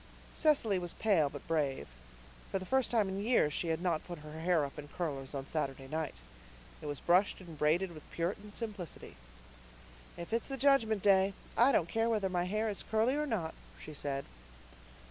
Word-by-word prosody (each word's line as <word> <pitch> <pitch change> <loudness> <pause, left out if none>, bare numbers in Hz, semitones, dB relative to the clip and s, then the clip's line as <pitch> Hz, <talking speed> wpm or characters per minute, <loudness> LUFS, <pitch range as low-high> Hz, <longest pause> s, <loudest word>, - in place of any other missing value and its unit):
Cecily 255 -11 +3
was 175 -1 -5
pale 180 -10 +3
but 145 0 -9
brave. 145 -5 0 0.6
For - - 0
the 190 - -5
first 265 +4 +2
time 220 -4 +2
in 190 +1 -3
years 210 - +3
she 170 - -1
had 165 +1 -1
not 170 -4 +1
put 175 -1 -7
her 155 +1 -8
hair 165 -2 +3
up 140 +2 -8
in 145 - -8
curlers 145 -4 -4
on 135 0 -4
Saturday 135 -3 -2
night. 155 +1 -3 0.7
It 150 - -6
was 145 -1 -3
brushed 180 +4 +3
and 170 -4 -10
braided 165 +5 +2
with 155 -2 -12
Puritan 195 +5 -3
simplicity. 205 -6 -6 1.0
"If 170 +5 -6
it's 230 +3 0
the 270 - -3
Judgment 240 -7 +3
Day 195 -1 +5 0.2
I 245 +4 +6
don't 170 - +3
care 225 +4 +1
whether 210 -4 +1
my 175 -1 0
hair 215 +4 0
is 205 -2 -2
curly 220 +5 +2
or 300 0 0
not," 185 - -1 0.3
she 155 - -9
said. 140 -1 -3
180 Hz, 190 wpm, -33 LUFS, 155-215 Hz, 1.0 s, I